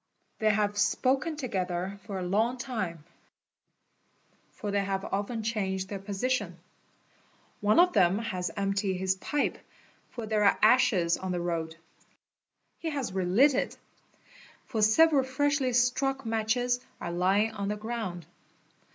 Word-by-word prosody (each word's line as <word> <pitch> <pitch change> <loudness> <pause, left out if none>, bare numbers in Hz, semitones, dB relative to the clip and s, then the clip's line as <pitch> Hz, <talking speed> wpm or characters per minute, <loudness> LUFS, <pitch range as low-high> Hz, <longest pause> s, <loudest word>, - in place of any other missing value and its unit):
They 215 - +3
have 205 -1 +1
spoken 265 +8 +1
togethe 190 - -3
for 200 0 -7
a 185 - -3
long 220 +7 +1
time, 215 - -4 1.5
for 205 - -5
they 200 0 +1
have 195 0 -2
often 210 +3 -3
changed 190 -4 -2
their 200 - -4
position. 200 -1 -2 1.0
One 210 +6 +3
of 360 +1 +5
then 190 -2 +4
has 185 -6 -3
emptied 195 -1 0
his 190 0 +1
pipe, 290 +9 -1 0.5
for 235 - -6
there 215 -1 +1
are 200 - +4
ashes 210 -7 +4
on 190 0 -4
the 180 - -1
road; 165 -2 -3 1.0
he 330 - -3
has 275 -10 -3
relit 195 +10 +4
it, - - -2 0.9
fo: 230 -5 -2
several 275 +7 +5
freshly 270 0 0
struck 250 +2 +1
matches 225 +3 0 0.2
are 170 - -4
lying 190 +5 +2
on 200 -2 -4
the 210 +1 -2
ground. 215 -6 -5
210 Hz, 135 wpm, -29 LUFS, 190-245 Hz, 1.5 s, of